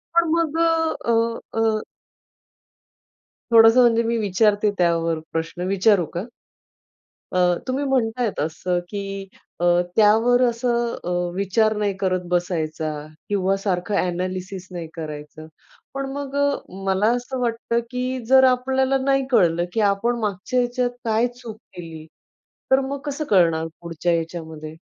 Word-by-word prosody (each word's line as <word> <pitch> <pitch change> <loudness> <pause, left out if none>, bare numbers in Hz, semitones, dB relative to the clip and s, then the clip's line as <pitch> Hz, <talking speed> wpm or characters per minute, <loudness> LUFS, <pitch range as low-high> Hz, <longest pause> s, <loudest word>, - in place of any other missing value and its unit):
पण 340 -1 +4
मग, 330 -1 +1
अ, 325 -6 +1
अ, 230 0 -1
अ. 220 -1 +1 1.7
थोडंसं 225 +2 +7
म्हणजे 230 -1 +4
मी 230 0 0
विचारते 210 0 +2
त्यावर 165 -2 +1
प्रश्न 165 +2 -4
विचारू 195 -2 +3
का? 175 - -2 1.1
अ, 185 - +2 0.3
तुम्ही 265 +3 -1
म्हणत 250 -3 0
आहेत 230 -4 -1
असं 175 +4 -1
की 195 -1 -5 0.3
अ, - - +2 0.3
त्यावर 225 +3 +4
असं 235 0 0
अ, 180 - -4 0.3
विचार 215 +3 +1
नाही 205 -2 0
करत 185 -2 0
बसायचा 160 -3 -1 0.4
किंवा 195 -1 +1
सारखं 185 0 -1
अ‍ॅनॅलिसिस 185 +1 -3
नाही 170 -2 -6
करायचं. 155 -1 -8 0.5
पण 275 0 -3
मग 280 -1 -5
अ, 285 0 +3 0.4
मला 195 +3 +2
असं 245 +2 -4
वाटतं 235 0 0
की 255 +1 -2
जर 265 0 +7
आपल्याला 260 +1 +2
नाही 270 0 +2
कळलं 175 -6 +3
की 225 - 0
आपण 235 +4 -1
मागच्या 210 +4 -1
ह्याच्यात 245 0 0 0.2
काय 225 +2 +2
चूक 225 -4 -9 0.2
केली 165 -3 -9 0.7
तर 265 +1 +5
मग 275 +1 -3
कसं 290 +1 -3
कळणार 165 -4 +3
पुढच्या 170 0 -2
याच्यामध्ये? 160 -2 -4
215 Hz, 135 wpm, -22 LUFS, 180-245 Hz, 1.7 s, थोडंसं